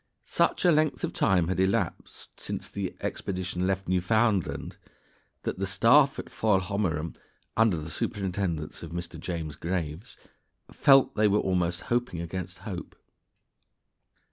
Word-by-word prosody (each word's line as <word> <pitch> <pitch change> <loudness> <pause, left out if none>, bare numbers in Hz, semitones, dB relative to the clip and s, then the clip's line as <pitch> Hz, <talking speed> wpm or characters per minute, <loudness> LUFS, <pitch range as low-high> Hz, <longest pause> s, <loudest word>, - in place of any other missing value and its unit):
] - - -48
Such - - +1
a 175 - +7
length 155 -1 +2
of - - -1
time 90 -3 +2
had 95 +1 -1
elapsed 95 +1 -2
since - - -5
the - - -4
expedition 90 -1 -2
left 95 0 -1
Newfoundland 100 +2 +1 0.7
that - - -3
the 95 - 0
staff 130 +8 +5
at - - -7
Foilhommerum, 95 -6 0 0.4
under 110 -6 +4
the 80 +1 -6
superintendence 90 -5 -2
of 85 - -7
Mr. 85 -1 -6
James 80 -3 -4
Graves, 85 +2 -4 0.5
felt 135 -1 +5
they 105 0 +3
were 105 0 +3
almost 90 -2 0
hoping 120 -7 -1
against 90 +2 -5
hope. 95 -5 -6
95 Hz, 135 wpm, -28 LUFS, 85-105 Hz, 0.7 s, a